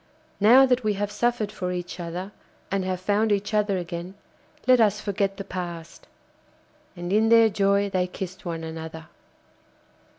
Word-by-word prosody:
Now 240 +6 +7
that 255 -1 +1
we 215 -1 +1
have 205 +1 -2
suffered 220 -1 0
for 180 -2 -4
each 180 0 -5
other, 175 +3 -5 0.4
and 195 -1 0
have 185 -1 -2
found 205 +3 +1
each 205 +1 -1
other 210 -2 +2
again, 175 +1 -6 0.5
let 255 -1 +5
us 210 -1 +3
forget 200 -1 -1
the 200 - -5
past.' 175 -3 -7 0.9
And 175 +1 -4
in 220 +1 +3
their 230 -1 +6
joy 200 0 +2
they 185 -2 0
kissed 185 0 -7
one 165 -3 -4
another. 160 0 -7
195 Hz, 160 wpm, -25 LUFS, 180-210 Hz, 0.9 s, Now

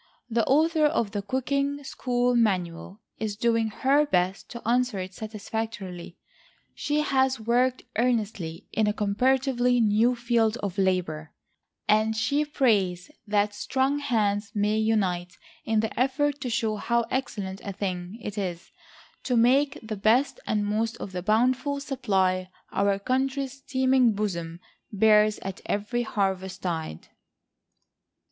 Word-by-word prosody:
The 230 0 +2
author 310 +2 +4
of 235 -9 0
THE 205 -1 -2
COOKING 275 +6 -1
SCHOOL 245 -2 0
MANUAL 190 -3 0 0.2
is 215 -2 -2
doing 230 0 +1
her 270 +6 +2
best 185 -3 0
to 235 -2 -8
answer 245 -2 +2
it 185 0 -5
satisfactorily. 215 -4 -6 0.6
She 295 +1 0
has 265 -3 +1
worked 245 +3 +1
earnestly 215 -9 -1
in 215 -1 +2
a 210 - +2
comparatively 245 +4 +2
new 225 +3 +3
field 235 -1 +1
of 195 -1 -3
labor, 180 -5 -1 0.5
and 215 +1 +3
she 280 +7 +1
prays 210 - +1 0.2
that 205 0 +1
strong 265 +4 0
hands 210 -6 0
may 210 +1 +1
unite 190 -5 0 0.3
in 220 -1 +2
the 220 +1 -4
effort 285 +2 +1
to 255 - -3
show 220 -2 0
how 235 +2 0
excellent 200 -7 -3
a 200 - -4
thing 185 0 -4
it 210 0 -4
is 180 -3 -5 0.5
to 250 -2 +1
make 275 +5 +3
the 220 -1 -5
best 235 - +2
and 210 -1 0
most 220 +2 -1
of 195 - -7
the 180 -1 -4
bountiful 250 +8 +1
supply 190 -10 0 0.2
our 200 0 +1
country's 265 +4 -2
teeming 260 -3 +3
bosom 170 -5 -3 0.3
bears 215 0 +4
at 195 -1 -6
every 210 +4 -1
harvest 190 -4 -2
tide. 160 - -4
220 Hz, 135 wpm, -26 LUFS, 200-255 Hz, 0.6 s, author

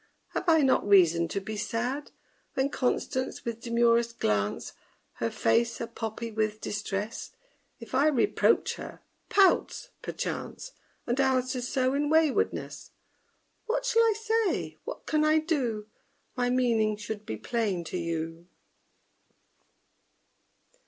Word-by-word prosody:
Have 360 - -2
I 320 -2 +5
not 260 -5 +3
reason 170 -4 +5
to 200 - -2
be 215 +3 -6
sad 245 +7 -2 0.5
When 270 +1 +1
CONSTANCE, 260 0 -1
with 235 -1 -3
demurest 235 0 +2
glance, 105 -1 -1 0.4
Her 115 - -1
face 230 - +1
a - - -2
poppy 225 0 -5
with 215 0 -1
distress, 210 +1 -4 0.5
If 230 +1 -11
I 275 +4 +4
reproach 305 +6 +2
her, - - -9 0.3
pouts, 390 -2 +3
perchance, - - -5 0.3
And 245 +2 -1
answers 255 -2 +1
so 260 0 +1
in 290 +1 0
waywardness? 320 +7 +1 0.8
_What - - +1
shall 460 -2 +3
I 455 -1 +4
say? 445 -2 0
what - - -7
can 305 -1 +2
I 310 +1 +4
do? 265 -10 -1 0.5
My 245 -1 +1
meaning 230 -4 +2
should 210 0 -6
be 110 - -5
plain 200 - -1
to 170 - -4
you! 165 0 -4
235 Hz, 125 wpm, -28 LUFS, 210-285 Hz, 0.8 s, I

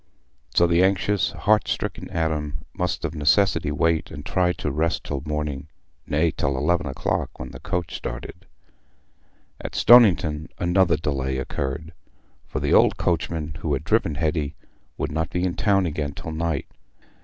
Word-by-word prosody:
So 85 - +6
the 85 +1 +3
anxious 95 +1 +2
heart 105 +1 +2
stricken - - -3
Adam 75 -3 -2
must 90 -1 -2
of 80 - -3
necessity 80 +1 +2
wait 80 +2 +1
and 70 +1 -9
try 90 -1 +2
to 75 - -3
rest 80 +4 0
till 70 -2 -4
morning—nay, 75 +1 -3
till 70 -1 -1
eleven 85 +4 +1
o'clock, 65 - -2
when 65 +1 -7
the 60 - -9
coach 90 0 -3
started. - - -7 1.1
At - - -6
Stoniton 85 -10 +5
another 90 -2 +3
delay 70 -4 -2
occurred, 70 +4 -4 0.5
for - - -3
the - - 0
old - - +5
coachman 80 -2 -1
who 75 - -1
had 70 - -1
driven 95 -4 +1
Hetty 75 -1 -1 0.4
would - - -2
not 80 +1 -1
be 90 - -2
in 90 - +1
the - - -10
town 100 -3 +3
again 75 -3 -2
till 80 - -7
night. 80 -2 -2
80 Hz, 155 wpm, -24 LUFS, 75-90 Hz, 1.1 s, So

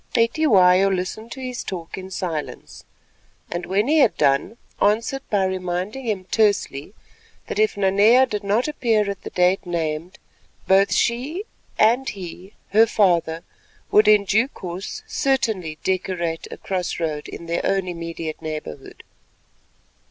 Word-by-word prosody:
Cetywayo 200 -7 +4
listened 195 +5 -4
to 265 - -9
his 250 -1 -5
talk 170 -3 -6
in 190 0 -8
silence, 165 -5 -5 0.7
and 175 0 -4
when 200 +5 +1
he 310 +2 +4
had 255 - +4
done 140 +11 +1 0.2
answered 225 +6 +1
by 200 -2 +2
reminding 185 +6 -3
him 200 -4 -1
tersely 200 -7 +1 0.5
that - - -4
if 215 -1 +2
Nanea 205 +6 +5
did 210 -5 -4
not 210 +7 +1
appear 230 -8 +1
at 200 - -8
the - - -7
date 180 +1 +2
named, 170 -1 -3 0.5
both 195 +1 +4
she 270 - 0 0.3
and 240 +5 +3
he, 185 +1 -9 0.2
her 220 +2 +5
father, 170 -6 +1 0.5
would 210 0 +5
in 210 -1 +6
due 220 +6 +2
course 190 - -7
certainly 235 - -1
decorate 180 -3 -2
a - - -8
cross 185 -3 -3
road 155 -3 -3
in 170 - -8
their 170 0 -1
own 195 -1 0
immediate 165 -2 -5
neighbourhood. 155 - -7
195 Hz, 140 wpm, -22 LUFS, 175-225 Hz, 0.7 s, in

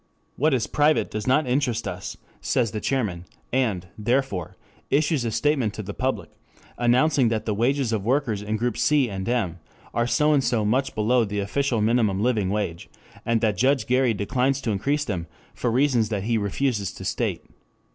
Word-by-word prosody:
What 150 +1 +2
is 120 - 0
private 150 +1 +2
does 110 +1 -4
not 145 +4 +3
interest 125 -3 0
us, - - -6 0.2
says 120 -5 +1
the 105 - -4
chairman, 100 -11 -1 0.3
and, 110 -9 0
therefore, 120 -6 -1 0.3
issues 150 -2 +2
a - - 0
statement 120 -1 0
to 110 - -5
the 100 +1 -6
public 130 +4 -2 0.4
announcing 130 +2 +3
that 110 -1 -1
the 110 - 0
wages 125 +2 +1
of 105 -3 -1
workers 120 -3 0
in 105 +1 -2
groups 120 +2 -1
C 140 -6 +3
and 95 +2 -4
M 95 -9 -1 0.3
are 120 0 +1
so 150 +4 +3
and 140 -2 +3
so 110 -4 +1
much 130 +6 0
below 115 +3 +3
the 105 -1 -4
official 115 +4 0
minimum 110 -3 +2
living 110 -4 +1
wage, 100 -5 -3 0.4
and 115 -1 +2
that 105 -4 +1
Judge 130 0 +2
Gary 125 -1 +2
declines 130 +6 0
to 115 - -1
increase 140 +9 0
them 85 -5 -3 0.3
for 120 - -1
reasons 120 -3 +2
that 105 -3 -2
he 115 +2 0
refuses 105 0 -1
to - - -9
state. - - -2
120 Hz, 185 wpm, -24 LUFS, 105-135 Hz, 0.4 s, not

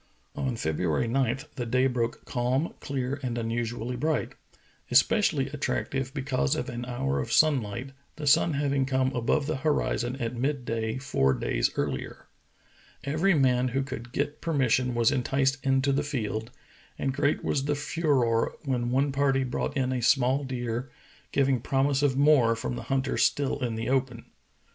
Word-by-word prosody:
On 130 -3 -2
February 80 +4 0
9 130 0 +1 0.2
the 120 - -2
day 130 +3 +2
broke 120 -3 -1
calm, 125 +5 -1
clear, 135 0 -3
and 120 -3 -3
unusu 115 0 -2
ally 125 +2 -3
bright; 155 +5 -1 0.6
especially 140 - +3
attractive 135 -2 -2
because 140 0 0
of 140 -3 -3
an 120 0 -5
hour 70 - -1
of 65 - -4
sunlight, 130 -4 +2 0.2
the 155 - -6
sun 160 +3 +4
having 140 -2 +1
come 130 -1 +1
above 125 +5 +1
the 155 -1 -1
horizon 130 -4 0
at 120 -2 -3
mid 135 +1 -1
day 110 0 -2
four 100 - +1
days - - 0
earlier. - - -3 0.8
Every 160 +7 +2
man 130 -3 +3
who 135 +2 -1
could 120 -3 -7
get 145 +3 -2
per 165 - -2
mission 125 -2 +2
was 115 -1 +3
enticed 135 +2 0
into 135 0 +2
the 140 +1 +1
field, 115 -6 -3 0.5
and 135 - -1
great 145 +1 0
was 140 -2 0
the 145 0 +1
furore 140 -7 +1
when 125 -3 0
one 135 +3 +1
party 135 -1 +2
brought 130 +2 -2
in 130 -1 0
a 125 - -1
small 130 +2 +3
deer, 120 -1 -3 0.4
giv 135 -1 +2
ing 130 -2 +2
promise 135 +3 +1
of 140 -2 +2
more 140 -6 +5
from 115 +1 -4
the 120 - -6
hunters 135 0 +1
still 140 0 +1
in 120 -2 -1
the 115 0 -3
open. 130 -3 -1
130 Hz, 170 wpm, -27 LUFS, 120-140 Hz, 0.8 s, more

